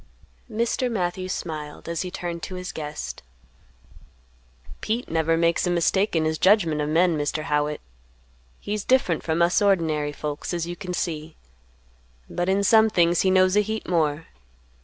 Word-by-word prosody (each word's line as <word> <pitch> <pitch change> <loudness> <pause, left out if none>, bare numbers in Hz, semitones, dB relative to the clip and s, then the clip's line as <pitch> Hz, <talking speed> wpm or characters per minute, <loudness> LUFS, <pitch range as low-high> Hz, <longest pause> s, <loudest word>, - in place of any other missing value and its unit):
Mr. 235 +3 0
Matthews 185 -2 -2
smiled, 155 -5 -6
as 170 -1 -2
he 185 - -4
turned 175 -1 -5
to 185 - -6
his 180 0 -5
guest. 150 -1 -6 1.6
"Pete 230 +3 -2
never 165 0 +2
makes 170 +2 +2
a - - +1
mistake 175 +3 +1
in 160 -1 +2
his 155 0 -1
judgment 175 -7 +3
of 150 - -1
men, 170 +2 +3
Mr. 150 +1 -2
Howitt. 150 -1 -1 0.8
He's 210 0 -3
different 255 -11 +2
from 165 +1 +1
us 175 +3 +3
ordinary 160 -7 +1
folks, 150 +3 -4
as 170 -1 -2
you 175 +1 -5
can 180 -1 -5
see; 160 -3 -4 0.9
but 175 +1 -2
in 195 +1 +2
some 220 +2 +5
things 175 -3 +3
he 190 - +2
knows 185 0 +4
a 210 - +5
heap 220 +1 -4
more. 160 -2 0
175 Hz, 160 wpm, -24 LUFS, 155-190 Hz, 1.6 s, some